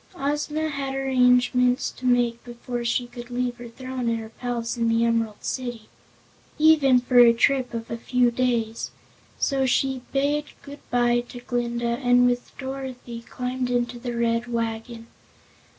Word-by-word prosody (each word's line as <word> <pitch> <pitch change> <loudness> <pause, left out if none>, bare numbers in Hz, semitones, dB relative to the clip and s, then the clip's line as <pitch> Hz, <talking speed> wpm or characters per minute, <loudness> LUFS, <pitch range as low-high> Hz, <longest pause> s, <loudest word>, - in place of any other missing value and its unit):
Ozma 300 +1 -1
had 275 -2 -3
many 270 0 -2
arrangements 250 0 +3
to 255 - -5
make 240 -1 +2
before 240 0 -5
she 240 +1 0
could 240 0 -10
leave 245 0 -2
her 240 - -9
throne 255 0 -4
and 230 - 0
her 220 -1 -7
palace 235 0 -3
in 230 -1 +1
the 230 +1 +3
Emerald 225 -2 -1
City, 240 -4 -4 0.7
even 300 -5 +5
for 245 0 +3
a 240 -1 +9
trip 260 +2 +2
of 230 0 -6
a 230 - -2
few 245 +1 +2
days, 235 -2 -1 0.5
so 270 -2 +1
she 265 +1 +1
bade 290 +2 +1 0.2
goodbye 245 -4 0
to 245 - -8
Glinda 240 -1 -2
and 245 -1 +5
with 245 0 0
Dorothy 260 -3 -6
climbed 250 +1 -3
into 240 0 -1
the 240 -1 -4
Red 230 0 0
Wagon. 230 0 -3
245 Hz, 155 wpm, -24 LUFS, 235-260 Hz, 0.7 s, a